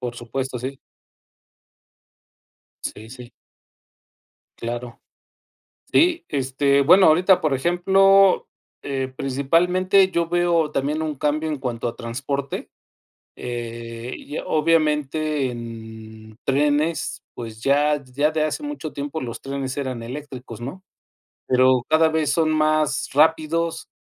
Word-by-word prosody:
Por 125 Hz, -1 st, -4 dB
supuesto, 125 Hz, +2 st, -4 dB
sí. 130 Hz, +3 st, -6 dB, 2.1 s
Sí, 110 Hz, +1 st, -6 dB
sí. 125 Hz, -1 st, -11 dB, 1.3 s
Claro. 120 Hz, 0 st, -6 dB, 0.9 s
Sí, 345 Hz, 0 st, +3 dB
este 140 Hz, +1 st, +1 dB
bueno, 180 Hz, +7 st, +6 dB
ahorita, 180 Hz, +4 st, +5 dB
por 155 Hz, -3 st, 0 dB
ejemplo, 190 Hz, +6 st, +4 dB, 0.3 s
eh, 135 Hz, -2 st, -3 dB
principalmente 180 Hz, +9 st, +2 dB
yo 170 Hz, -2 st, 0 dB
veo 170 Hz, -3 st, +1 dB
también 150 Hz, +3 st, -1 dB
un 155 Hz, -2 st, -2 dB
cambio 150 Hz, +3 st, -1 dB
en 150 Hz, -, -2 dB
cuanto 120 Hz, -3 st, -3 dB
a 115 Hz, -, -4 dB
transporte. 135 Hz, +4 st, -4 dB, 0.7 s
Eh, 115 Hz, 0 st, -6 dB
y 145 Hz, -, -7 dB
obviamente 155 Hz, -2 st, +1 dB
en 110 Hz, -2 st, -10 dB
trenes, 150 Hz, +4 st, 0 dB
pues 115 Hz, -1 st, -8 dB
ya 145 Hz, +1 st, +2 dB
ya 140 Hz, +4 st, 0 dB
de 155 Hz, 0 st, 0 dB
hace 155 Hz, -, -2 dB
mucho 290 Hz, -, -5 dB
tiempo 145 Hz, +2 st, -4 dB
los 120 Hz, -3 st, -6 dB
trenes 135 Hz, -1 st, -4 dB
eran 130 Hz, -4 st, -3 dB
eléctricos, 125 Hz, -3 st, -8 dB
¿no? 135 Hz, +11 st, -7 dB, 0.7 s
Pero 130 Hz, -1 st, +4 dB
cada 160 Hz, +1 st, +4 dB
vez 155 Hz, -2 st, 0 dB
son 160 Hz, -1 st, +2 dB
más 155 Hz, -2 st, +1 dB
rápidos, 160 Hz, +2 st, +1 dB
140 Hz, 115 wpm, -22 LUFS, 125-160 Hz, 2.1 s, bueno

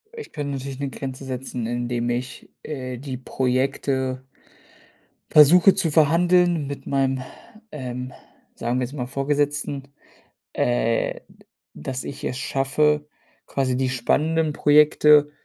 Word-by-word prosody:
Ich 450 Hz, -1 st, -9 dB
kann 145 Hz, -2 st, -4 dB
natürlich 135 Hz, 0 st, -5 dB
'ne 140 Hz, -1 st, -2 dB
Grenze 135 Hz, 0 st, -7 dB
setzen, 130 Hz, -2 st, -4 dB
indem 120 Hz, 0 st, -2 dB
ich, 125 Hz, +1 st, -4 dB
äh, 130 Hz, -4 st, -5 dB
die 130 Hz, 0 st, -6 dB
Projekte 130 Hz, 0 st, -1 dB, 1.0 s
versuche 170 Hz, +6 st, +7 dB
zu 165 Hz, -, 0 dB
verhandeln 170 Hz, +1 st, +3 dB
mit 140 Hz, 0 st, -7 dB
meinem, 135 Hz, -1 st, 0 dB, 0.5 s
ähm, 125 Hz, -2 st, -6 dB, 0.4 s
sagen 120 Hz, +2 st, -1 dB
wir 125 Hz, -, 0 dB
jetzt 135 Hz, -, -12 dB
mal 125 Hz, -4 st, -4 dB
Vorgesetzten, 140 Hz, +1 st, -1 dB, 0.7 s
äh, -, -, 0 dB
d -, -, -22 dB, 0.3 s
dass 125 Hz, -, -5 dB
ich 140 Hz, 0 st, -7 dB
es 125 Hz, -, -2 dB
schaffe, 150 Hz, +3 st, +1 dB, 0.4 s
quasi 130 Hz, -2 st, -1 dB
die 130 Hz, 0 st, 0 dB
spannenden 155 Hz, +5 st, +1 dB
Projekte 150 Hz, 0 st, +5 dB
135 Hz, 125 wpm, -23 LUFS, 130-150 Hz, 1.0 s, versuche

